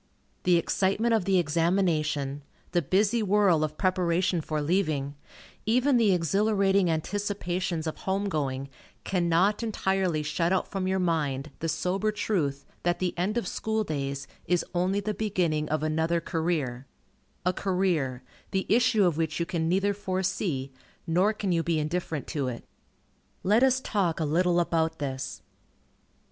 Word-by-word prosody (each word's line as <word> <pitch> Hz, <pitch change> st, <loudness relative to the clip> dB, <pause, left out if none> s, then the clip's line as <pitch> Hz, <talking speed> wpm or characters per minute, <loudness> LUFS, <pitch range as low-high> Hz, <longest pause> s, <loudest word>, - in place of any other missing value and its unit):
The 180 Hz, -1 st, +5 dB
excitement 195 Hz, +7 st, +1 dB
of 220 Hz, -5 st, +2 dB
the 195 Hz, -1 st, +3 dB
examination, 155 Hz, -4 st, +1 dB, 0.3 s
the 175 Hz, -, +2 dB
busy 205 Hz, -, +2 dB
whirl 195 Hz, -6 st, +3 dB
of 155 Hz, 0 st, -3 dB
preparation 180 Hz, -1 st, +1 dB
for 155 Hz, 0 st, -2 dB
leaving, 150 Hz, -4 st, 0 dB, 0.5 s
even 250 Hz, +4 st, +3 dB
the 220 Hz, -4 st, +4 dB
exhilarating 195 Hz, +1 st, +2 dB
anticipations 180 Hz, -1 st, -2 dB
of 160 Hz, -, -3 dB
home 195 Hz, +1 st, -1 dB
going, 140 Hz, -6 st, -2 dB, 0.3 s
cannot 180 Hz, +3 st, +2 dB
entirely 190 Hz, -7 st, 0 dB
shut 165 Hz, +3 st, 0 dB
out 190 Hz, -, +1 dB
from 195 Hz, -2 st, -3 dB
your 190 Hz, 0 st, +1 dB
mind 155 Hz, -6 st, -1 dB
the 165 Hz, -, -2 dB
sober 180 Hz, +7 st, 0 dB
truth 150 Hz, -10 st, -1 dB, 0.2 s
that 175 Hz, 0 st, +1 dB
the 185 Hz, -1 st, -1 dB
end 190 Hz, +6 st, -1 dB
of 230 Hz, -, -1 dB
school 220 Hz, +2 st, -1 dB
days 140 Hz, -5 st, -3 dB, 0.2 s
is 180 Hz, -1 st, +1 dB
only 185 Hz, +3 st, +1 dB
the 210 Hz, +1 st, -2 dB
beginning 180 Hz, -7 st, 0 dB
of 155 Hz, 0 st, 0 dB
another 160 Hz, +2 st, +1 dB
career, 160 Hz, -7 st, -2 dB, 0.6 s
a 180 Hz, -, +2 dB
career, 175 Hz, -10 st, 0 dB, 0.3 s
the 190 Hz, 0 st, -1 dB
issue 225 Hz, -2 st, +4 dB
of 170 Hz, -4 st, +1 dB
which 160 Hz, -1 st, -1 dB
you 170 Hz, -, 0 dB
can 165 Hz, -2 st, -1 dB
neither 195 Hz, +3 st, +2 dB
foresee, 185 Hz, -8 st, -2 dB, 0.3 s
nor 180 Hz, +6 st, +3 dB
can 205 Hz, -3 st, -2 dB
you 170 Hz, -1 st, +2 dB
be 165 Hz, -1 st, 0 dB
indifferent 155 Hz, -1 st, -2 dB
to 145 Hz, -5 st, -2 dB
it. 120 Hz, -2 st, -5 dB, 0.8 s
Let 210 Hz, +5 st, +4 dB
us 260 Hz, 0 st, +4 dB
talk 190 Hz, -10 st, 0 dB
a 160 Hz, -, 0 dB
little 175 Hz, +3 st, +2 dB
about 160 Hz, -1 st, 0 dB
this. 135 Hz, -2 st, -4 dB
175 Hz, 150 wpm, -27 LUFS, 155-195 Hz, 0.8 s, The